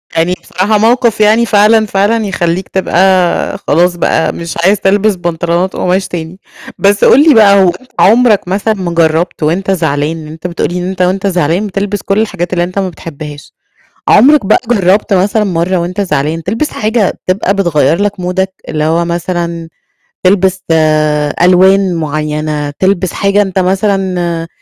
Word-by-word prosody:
يعني 165 +2 +1
بصراحة 200 +5 0
موقف 225 0 +1
يعني 220 +3 +3
فعلًا، 215 +1 +3
فعلًا 210 +3 0
يخلّيك 180 -1 -2
تبقى 190 0 +1
خلاص 175 +4 +2
بقى، 160 -1 0
مش 170 -1 -7
عايز 200 +1 +3
تلبِس 205 +1 +1
بنطلونات 175 +1 -2
قُماش 185 +1 -1
تاني، 170 +1 -7 0.4
بس 200 0 +1
قُل 275 - +6
لي - - +6
بقى 200 -4 +5
هو - - +3
أنت 255 - -22
عُمرك 220 -2 +3
مثلًا، 200 +4 0
ما 185 -4 -4
جرّبت 165 0 0
وأنت 180 +6 0
زعلان، 160 -3 -1
لأن 155 - -10
أنت 160 +3 -7
بتقول 170 - -3
لي 180 - -3
إن 180 - -4
أنت 190 -1 -4
وأنت 190 +2 0
زعلان 180 +2 0
بتِلبس 200 +1 -3
كُلّ 195 +1 -1
الحاجات 190 -5 -2
اللي 175 -1 0
أنت 180 +3 -4
ما 190 -1 -2
بتحِبهاش، 150 -3 -10 0.6
عُمرك 270 +2 +5
بقى - - +4
جرّبت 205 -1 +1
مثلًا، 205 +3 +1
مرّه 180 -1 -1
وأنت 180 +3 -3
زعلان 165 -3 -2
تلبِس 225 - -2
حاجة 215 -2 -1
تبقى 195 +1 0
بتغيّرلَك 180 +2 0
مودك 190 +1 -2
اللي 155 -1 -2
هو 165 +2 +1
مثلًا، 170 -1 -4 0.6
تلبس 190 0 +2
آآ 155 -2 +1
ألوان 185 +1 +3
مُعيّنة، 150 -1 -3
تلبِس 185 -2 0
حاجة 200 +1 +1
أنت 190 -1 -3
مثلًا 185 -3 -1
185 Hz, 160 wpm, -11 LUFS, 170-200 Hz, 0.6 s, قُل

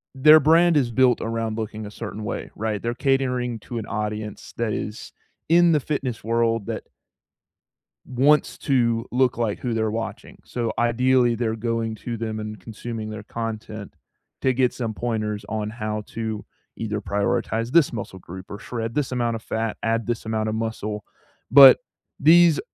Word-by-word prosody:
their 150 +4 +8
brand 165 +3 +5
is 125 -5 +1
built 125 0 +3
around 115 -1 -2
looking 110 -1 -5
a 105 - -8
certain 105 0 -7
way, - - -4
right? 110 -1 -2
They're 120 0 -1
catering 125 -3 0
to 120 - -6
an 110 - -4
audience 105 0 -4
that 115 -2 -1
is 105 +2 -5 0.4
in 170 +1 +6
the 150 - +4
fitness 135 -4 -3
world 115 -1 +1
that - - -4 1.2
wants 140 +4 +3
to 115 -4 +1
look 125 -1 +2
like 115 -4 -1
who 125 -2 -2
they're 110 -1 0
watching. 115 +1 -6
So, 120 -2 -2
ideally, 120 +1 +3
they're 115 -1 -1
going 115 0 -2
to 115 +1 -5
them 110 -1 -4
and 105 -1 -6
consuming 110 +2 -6
their 105 -1 -7
content 110 -2 -6 0.5
to 130 - +2
get 125 0 +2
some 115 -3 -3
pointers 110 -2 -3
on 110 -1 -2
how 110 -1 -4
to 110 -2 -4 0.3
either 105 -2 -3
prioritize 115 +3 -1
this 170 -2 +5
muscle 105 -4 -6
group 95 +1 -10
or 100 - -6
shred 115 0 -5
this 145 -3 0
amount 120 -2 0
of 110 - -7
fat, 110 -1 -2
add 115 0 0
this 120 -2 -2
amount 110 -1 -1
of 110 - -2
muscle. 110 -2 -3 0.5
But 135 0 +10 0.4
these 165 +1 +6
115 Hz, 170 wpm, -23 LUFS, 110-125 Hz, 1.2 s, But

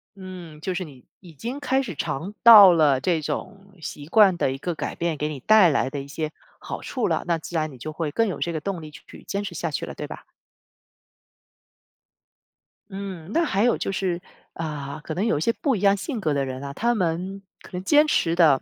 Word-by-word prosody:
嗯， 180 -5 -10
就 185 +3 -3
是 185 +1 -3
你 135 -6 -14 0.2
已 170 -4 -14
经 240 - -5
开 265 -1 +1
始 195 - -6
尝 170 +11 -4
到 205 -6 +10
了 145 -5 +4
这 160 +2 0
种 195 +5 -6
习 145 -1 -7
惯 200 -1 +5
的 135 - +1
一 135 - -4
个 175 +4 -4
改 - - -4
变 170 -1 -2
给 150 +1 -2
你 145 - -6
带 205 - +6
来 135 -2 +1
的 140 +1 -4
一 140 - -10
些 155 +2 -4 0.3
好 - - -6
处 - - -2
了， - - 0
那 170 -1 +2
自 165 +2 -9
然 155 -1 0
你 130 - -12
就 155 +6 -7
会 155 -2 -3
更 225 +6 +1
有 190 - -4
这 170 - -1
个 160 - -3
动 180 0 -4
力 155 - -10
去 - - -14
坚 200 - -3
持 175 -3 -6
下 165 0 -2
去 - - -3
了， - - -8
对 - - -6
吧？ - - -9 2.7
嗯， 190 -2 -7
那 335 +5 +2
还 200 -6 +1
有 245 - +3
就 - - -3
是， 180 -2 -1 0.3
啊， 150 -3 -5
可 155 - -5
能 185 +6 -1
有 225 - +2
一 - - -3
些 230 - +2
不 270 -3 0
一 - - -4
样 200 0 +4
性 235 - -4
格 155 -6 0
的 140 -1 0
人 130 0 -5
啊， 140 0 -6
他 235 +9 +1
们 185 0 -2 0.2
可 - - -15
能 180 0 -4
坚 295 +7 +5
持 170 - +1
的 155 -6 +5
170 Hz, 250 characters per minute, -24 LUFS, 150-200 Hz, 2.7 s, 到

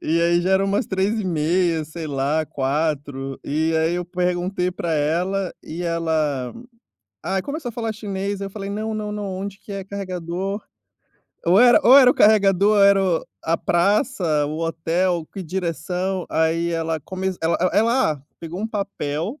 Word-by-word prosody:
E 165 +2 +1
aí 170 0 +3
já 185 - 0
era 190 +1 +3
umas 195 +1 0
3h30, 180 -4 0
sei 155 +1 -7
lá, 145 +2 0
4 140 -1 -2
e 160 +3 0
aí 160 +2 +1
eu 180 0 -2
perguntei 180 +1 -1
pra 170 -2 -3
ela 175 +5 0
e 170 +3 -6
ela 160 -6 -1 0.7
Ah, 190 0 -1
começou 285 - -5
a - - -7
falar 225 -2 -3
chinês, 200 -1 -4
eu 195 - -4
falei: 195 0 -6
"Não, 215 +2 -3
não, 210 -1 -3
não, 210 0 -4
onde 200 0 -5
que 205 - -11
é 195 -1 -4
carregador?" 190 0 -4 0.9
Ou 185 +6 +6
era 245 -1 +7
ou 255 +3 +9
era 250 -2 +7
o - - +1
carregador 205 -1 +4
era 200 0 +6
o 175 -4 0 0.2
a 165 +1 +2
praça, 175 - +1
o 155 +2 -4
hotel, 165 +1 0
que 195 - -6
direção. 180 +2 -2
Aí 165 +1 +1
ela 165 -1 -1
começ 185 +4 -4
ela 165 +1 +2
ela 185 - +2
ela 235 -2 +3
Ah, 135 - -15 0.2
pegou 170 +2 -6
um 220 - -1
papel 175 -7 -3
180 Hz, 170 wpm, -22 LUFS, 160-200 Hz, 0.9 s, ou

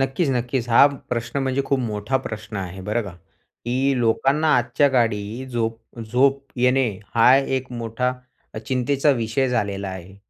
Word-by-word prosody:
नक्कीच, 135 +4 0
नक्कीच. 125 -1 -1
हा 120 +4 +7 0.3
प्रश्न 115 +3 -2
म्हणजे 135 +1 0
खूप 140 - 0
मोठा 110 +2 -1
प्रश्न 110 -1 -6
आहे, 95 0 -5
बरं 105 +4 -1
का 100 - -7 0.5
की 130 +2 +1
लोकांना 135 +7 +2
आजच्या 125 +4 +2
काळी 115 0 -1
झोप 115 -2 -2 0.3
झोप 135 +3 +3 0.2
येणे 125 0 +3 0.3
हा 115 +2 +6
एक 130 -2 -1
मोठा 120 +2 -2 0.4
अ, - - -4
चिंतेचा 130 +5 +1
विषय 115 +4 0
झालेला 100 -5 -2
आहे, 95 0 -9
120 Hz, 150 wpm, -22 LUFS, 110-135 Hz, 0.5 s, हा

